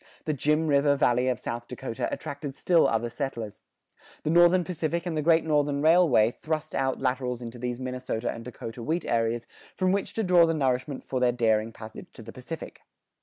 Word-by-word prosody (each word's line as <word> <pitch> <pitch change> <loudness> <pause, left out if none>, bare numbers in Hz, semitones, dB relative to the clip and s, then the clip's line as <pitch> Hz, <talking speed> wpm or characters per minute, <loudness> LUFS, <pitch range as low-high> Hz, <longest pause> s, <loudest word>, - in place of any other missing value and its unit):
The 155 - 0
"Jim 150 +3 +1
River" 140 -1 +3
Valley 125 -3 +2
of 125 -2 +1
South 120 0 -5
Dakota 115 -2 -4
attracted 140 -1 -5
still 170 +1 +3
other 115 +1 0
settlers. 120 -4 -5 0.6
The 155 - 0
Northern 175 +2 +5
Pacific 170 -1 -2
and 170 -2 -2
the 155 - 0
Great 165 +1 +4
Northern 145 -2 +1
Railway 155 -9 +5
thrust 155 +3 -4
out 135 -1 0
laterals 125 -2 -1
into 120 0 -8
these 125 0 -3
Minnesota 125 -2 -3
and 115 - -8
Dakota 115 -1 -8
wheat 160 +8 -2
areas 115 0 0 0.3
from 185 0 +1
which 200 +1 -1
to 225 - 0
draw 180 -3 +5
the 165 - 0
nourishment 130 -1 -1
for 130 - -3
their 125 -1 +3
daring 115 -2 +1
passage 110 0 -10
to 115 - -11
the 115 - -10
Pacific. 145 +6 -8
135 Hz, 190 wpm, -27 LUFS, 120-160 Hz, 0.6 s, Northern